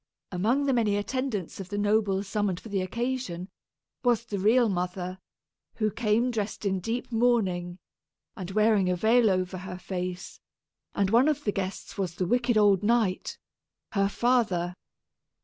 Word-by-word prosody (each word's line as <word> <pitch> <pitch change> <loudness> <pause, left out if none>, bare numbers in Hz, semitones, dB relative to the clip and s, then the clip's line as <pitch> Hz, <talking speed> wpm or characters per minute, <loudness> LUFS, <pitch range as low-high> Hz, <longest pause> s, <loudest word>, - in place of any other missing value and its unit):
Among 225 +10 +1
the 270 - +2
many 215 -4 +2
attendants 210 -3 -3
of 190 -2 -7
the 205 - -3
nobles 205 -1 +1
summoned 200 -3 -1
for 225 - -11
the 200 -2 0
occasion, 220 -3 -3 0.5
was 240 -2 +2
the 205 -4 -4
real 230 +5 +4
mother, 180 -1 -3 0.6
who 215 -2 0
came 230 +3 +1
dressed 215 -2 -3
in 190 -1 +1
deep 230 +7 -3
mourning 195 -7 +1 0.6
and 185 -2 -6
wearing 210 -2 +3
a 180 - +2
veil 225 +4 +4
over 185 0 -1
her 180 0 -7
face; 180 0 -5 0.6
and 200 -1 +1
one 240 +5 +5
of 295 -1 0
the 205 - +1
guests 195 +1 -5
was 180 -3 -2
the 180 - -1
wicked 240 +3 +2
old 200 -3 +5
knight, 215 -3 +1 0.5
her 195 -1 +1
father. 200 -8 +1
205 Hz, 155 wpm, -27 LUFS, 185-235 Hz, 0.6 s, one